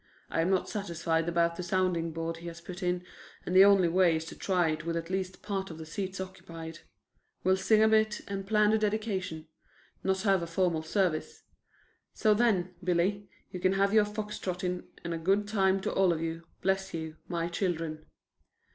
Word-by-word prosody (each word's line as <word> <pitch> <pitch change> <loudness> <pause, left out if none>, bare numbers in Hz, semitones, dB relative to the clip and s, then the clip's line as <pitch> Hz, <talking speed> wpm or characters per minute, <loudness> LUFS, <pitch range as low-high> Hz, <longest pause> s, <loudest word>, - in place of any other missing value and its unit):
I - - +1
am 170 - +1
not 190 -1 +1
satisfied 170 -5 -1
about 170 0 +1
the - - -3
sounding 180 -2 0
board 165 +1 -3
he 170 +1 -9
has 170 0 -7
put 175 +2 -9
in, 180 0 -1 0.4
and 180 - -2
the 190 - +10
only 200 -3 +6
way 175 -1 +4
is 160 0 -3
to - - -8
try 180 -4 +1
it 155 0 -4
with 165 +1 -2
at 165 +2 -5
least 190 -1 -3
part 195 -2 -3
of 160 - -8
the 160 - -7
seats 190 +3 -4
occupied. 165 -3 -8 0.6
We'll 185 +1 +4
sing 215 +3 +4
a - - +6
bit 220 -1 +3
and 195 -1 -4
plan 210 0 +4
the 220 - +3
dedication; 205 -7 -2 0.6
not 190 0 +1
have 195 -4 +3
a 170 - -3
formal 165 -1 +1
service. 165 -1 -1 0.7
So 215 -2 +4
then, 205 -5 +2
Billy, 185 +3 0 0.2
you 180 - -5
can 185 +1 +2
have 200 +1 +2
your 215 -1 +6
fox 210 0 -5
trotting 180 -1 -3 0.2
and 170 0 -3
a 165 - -3
good 195 +5 +2
time 195 -2 +2
to - - -2
all 190 -2 +4
of 165 - -1
you, 165 0 -4 0.2
bless 190 -1 0
you, 160 -1 -5
my 170 -1 -1
children." 165 -3 -2
185 Hz, 200 wpm, -30 LUFS, 165-195 Hz, 0.7 s, the